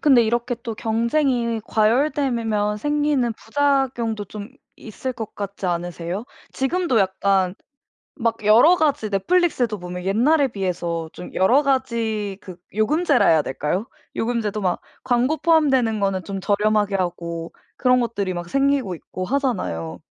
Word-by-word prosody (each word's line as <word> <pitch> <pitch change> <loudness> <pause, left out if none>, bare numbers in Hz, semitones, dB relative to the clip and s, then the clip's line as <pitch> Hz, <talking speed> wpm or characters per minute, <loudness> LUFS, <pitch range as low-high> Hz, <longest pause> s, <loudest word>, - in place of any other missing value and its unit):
근데 265 -5 +5
이렇게 240 +2 0
또 230 -3 -4
경쟁이 235 +1 0
과열되면 225 -3 +1
생기는 290 -3 +1
부작용도 245 -5 0
좀 205 +2 -8 0.3
있을 255 +4 -6
것 225 -3 -7
같지 200 -1 -5
않으세요? 175 +3 -3 0.3
지금도 270 -2 0
약간 190 -1 +1 0.6
막 230 -4 -2
여러 240 +12 +6
가지 290 -9 +1
Netflix도 240 - +1
보면 180 0 -7
옛날에 265 +9 +3
비해서 175 -5 -3
좀 180 - -10
여러 245 +10 +4
가지 230 -7 -1
그 185 -3 -10 0.2
요금제라 290 +6 +2
해야 160 -2 +5
될까요? 150 - -2 0.3
요금제도 225 -3 -1
막 180 -2 0 0.2
광고 255 +5 +1
포함되는 270 -9 +3
거는 195 -2 0
좀 195 -1 -5
저렴하게 205 0 +1
하고 170 -2 -4 0.2
그런 250 -1 +3
것들이 200 -6 -2
막 175 0 -5
생기고 275 -7 +1
있고 185 +2 -7
하잖아요. 185 - -2
220 Hz, 315 characters per minute, -22 LUFS, 195-265 Hz, 0.6 s, 여러